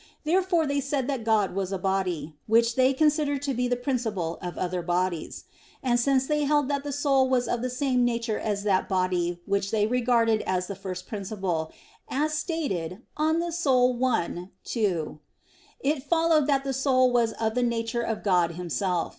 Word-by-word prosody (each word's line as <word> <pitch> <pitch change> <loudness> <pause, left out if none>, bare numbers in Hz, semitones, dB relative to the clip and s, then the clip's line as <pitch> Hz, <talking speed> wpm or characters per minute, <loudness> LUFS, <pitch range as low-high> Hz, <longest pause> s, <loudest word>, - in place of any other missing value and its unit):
Therefore 345 +1 +2
they 285 0 0
said 275 -1 -1
that 270 -5 -2
God 220 -4 +2
was 195 0 -2
a 195 - -1
body, 185 -4 -1
which 230 +1 +4
they 260 0 +4
considered 290 0 +1
to 280 -1 -1
be 250 0 0
the 245 - +1
principle 230 - -2
of 180 -1 -6
other 180 0 -2
bodies. 175 -1 -2 0.4
And 240 -2 +2
since 265 +1 +2
they 300 +1 0
held 290 -1 +2
that 280 -1 -1
the 290 - -4
soul 275 -2 +2
was 250 -1 +1
of 240 - -1
the 255 - -1
same 250 0 +1
nature 235 -2 0
as 205 -2 -2
that 195 -3 +1
body 180 -2 0
which 200 0 0
they 210 -1 +2
regarded 230 -2 +2
as 185 -1 0
the 200 - -5
first 185 -1 -6
principle, 190 -6 -3 0.4
as 300 +3 0
is 305 - -1
stated 235 - -3
De - - -5
Anima 330 +2 +1 0.5
i, 180 -7 -1
2, 180 -10 -1 0.6
it 295 -5 0
followed 325 0 +2
that 275 -2 +2
the 270 -1 -2
soul 255 -1 +3
was 235 -2 +2
of 220 -1 -1
the 250 - 0
nature 235 -1 -1
of 225 -2 -3
God 180 -4 +2
Himself. 180 +1 -1
235 Hz, 185 wpm, -26 LUFS, 190-275 Hz, 0.6 s, which